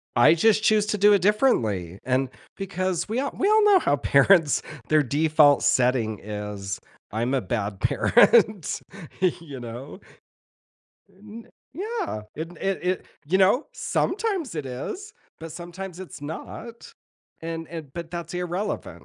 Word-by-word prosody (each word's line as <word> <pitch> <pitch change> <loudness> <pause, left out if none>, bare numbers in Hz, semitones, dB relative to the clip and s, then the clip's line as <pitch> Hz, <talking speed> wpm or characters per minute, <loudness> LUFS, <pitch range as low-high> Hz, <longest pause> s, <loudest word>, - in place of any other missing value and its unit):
I 120 +7 +6
just 215 +5 +3
choose 215 -1 +4
to 210 0 -1
do 205 +1 +6
it 200 - +2
differently, 110 - +1
and 130 +1 +1 0.3
because 185 -2 -2
we 225 +3 -2
all 280 - -2
we 390 - +2
all 430 0 +5
know 410 -2 +6
how 145 - +1
parents, 145 +3 +4 0.3
their 155 -1 +4
default 145 +1 +4
setting 125 -6 +2
is, 105 -1 -5 0.3
"I'm 115 +4 -1
a 135 - +2
bad 100 -2 -3
parent", 215 - +3 0.6
you 145 -5 -9
know? 120 - -8 1.1
Uh 185 - -26
n 215 +3 -11 0.3
yeah, 410 - -4
it 160 +2 -5
it 195 0 -1
it, 185 - -4 0.2
you 185 +5 +2
know, 195 +9 +3
sometimes 390 - -1
it 150 -4 -4
is, 355 - -6 0.3
but 165 0 -7
sometimes 175 +2 -8
it's 185 -4 -9
not, 225 +10 -8 0.5
and 165 0 -5
and 160 -5 -8
but 170 0 -7
that's 170 -1 -6
irrelevant. 180 +3 -4
170 Hz, 145 wpm, -25 LUFS, 135-210 Hz, 1.1 s, I